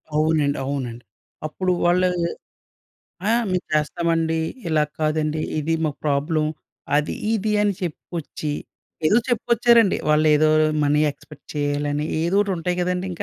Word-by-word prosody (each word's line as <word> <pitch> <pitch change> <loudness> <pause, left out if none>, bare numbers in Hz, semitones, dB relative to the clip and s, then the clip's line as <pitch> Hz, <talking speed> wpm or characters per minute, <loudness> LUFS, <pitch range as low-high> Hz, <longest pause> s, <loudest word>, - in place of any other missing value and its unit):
అవునండి. 155 -2 +2
అవునండి. 125 -4 -4 0.4
అప్పుడు 185 +4 -1
వాళ్ళా 180 +1 +3 1.2
ఆ! - - +4 0.2
మేము 180 0 0
చేస్తామండి, 165 +1 +1 0.3
ఇలాగ 150 -1 +2
కాదండి, 155 0 0 0.2
ఇది 160 +2 0
మాకు 150 -2 -2
ప్రాబ్లమ్, 150 +2 +1 0.5
అది 150 - 0 0.2
ఇది 215 0 0
అని 205 -2 +1
చెప్పుకొచ్చి, 160 -2 -5 0.5
ఏదో 215 +8 +5
చెప్పుకొచ్చారండి. 235 -2 +3
వాళ్ళేదో 155 0 +4 0.4
మనీ 150 +1 +3
ఎక్స్పెక్ట్ 150 - -17
చెయ్యాలని 145 +1 -1 0.2
ఏదోటుంటయి 180 -1 0
గదండింక. 180 0 -2
155 Hz, 110 wpm, -22 LUFS, 150-180 Hz, 1.2 s, ఏదో